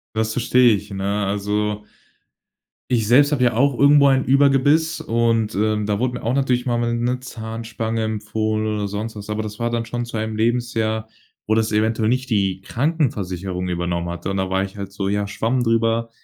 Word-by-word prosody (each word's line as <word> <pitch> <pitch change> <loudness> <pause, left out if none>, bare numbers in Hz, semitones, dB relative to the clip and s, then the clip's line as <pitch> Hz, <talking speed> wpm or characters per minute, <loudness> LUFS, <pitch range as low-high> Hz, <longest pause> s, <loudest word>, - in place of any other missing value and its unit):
Das 110 0 0
verstehe 125 -1 +4
ich, 100 +1 -7
ne? 100 +1 -1
Also 105 +1 -1 1.1
ich 115 -4 +1
selbst 145 +5 +5
habe 130 -4 +1
ja 120 - +3
auch 130 +2 +2
irgendwo 140 0 +6
ein 135 -1 +3
Überbiss 145 +4 +3
und, 115 -1 +1
ähm, 105 0 0
da 105 0 -1
wurde 125 0 0
mir - - -7
auch 115 +3 0
natürlich 130 -3 +1
mal 120 -1 0
'ne 125 +2 -1
Zahnspange 115 -1 -4
empfohlen 110 0 -2
oder 105 -1 -1
sonst 105 +3 -5
was, 105 0 -9
aber 105 +1 -2
das 105 +1 -7
war 120 0 0
dann 115 -1 -2
schon 120 +1 -3
zu 115 -1 -6
einem 110 0 -3
Lebensjahr, 110 -1 0 0.4
wo 110 - +1
das 110 -1 +1
eventuell 110 +1 +1
nicht 130 +1 -1
die 95 -2 +1
Krankenversicherung 95 - -2
übernommen 85 0 -2
hatte. 85 +2 -4
Und 95 - -2
da 95 0 -1
war 95 0 +1
ich 100 0 -7
halt 100 -1 -6
so: 100 -1 -3
„Ja, 100 0 -1
Schwamm 120 +5 -1
drüber. 115 0 +1
110 Hz, 190 wpm, -21 LUFS, 105-120 Hz, 1.1 s, irgendwo